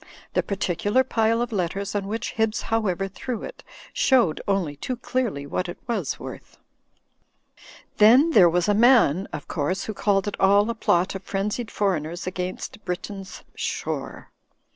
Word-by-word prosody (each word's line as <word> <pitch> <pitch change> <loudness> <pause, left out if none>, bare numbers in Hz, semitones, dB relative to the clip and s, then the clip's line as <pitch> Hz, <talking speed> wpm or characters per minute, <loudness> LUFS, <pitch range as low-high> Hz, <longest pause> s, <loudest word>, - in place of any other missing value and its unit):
The - - +2
particular 200 +5 0
pile 230 -1 +1
of 240 - -5
letters 195 0 -2
on 200 -1 -2
which 225 +3 -3
Hibbs 220 -1 0
However 195 -4 0
threw 225 +4 -5
it, - - -9 0.3
showed 245 - +3
only 190 -7 0
too 250 - -4
clearly 235 - -2
what 180 +5 -3
it 175 - -6
was 235 - -2
worth. - - -10 1.4
Then 245 +9 +6
there 185 - +7
was 175 +1 +1
a 205 - +3
man, 210 - +4
of - - -7
course, 180 +5 -2
who 215 - -4
called 200 -1 +1
it 205 - -4
all 200 +2 +5
a - - -3
plot 185 -5 +1
of 195 - -6
frenzied 205 +4 -3
foreigners 175 -4 -1
against 185 +3 -5
Britain's 190 +2 -6
shore. - - -4
200 Hz, 155 wpm, -24 LUFS, 180-225 Hz, 1.4 s, there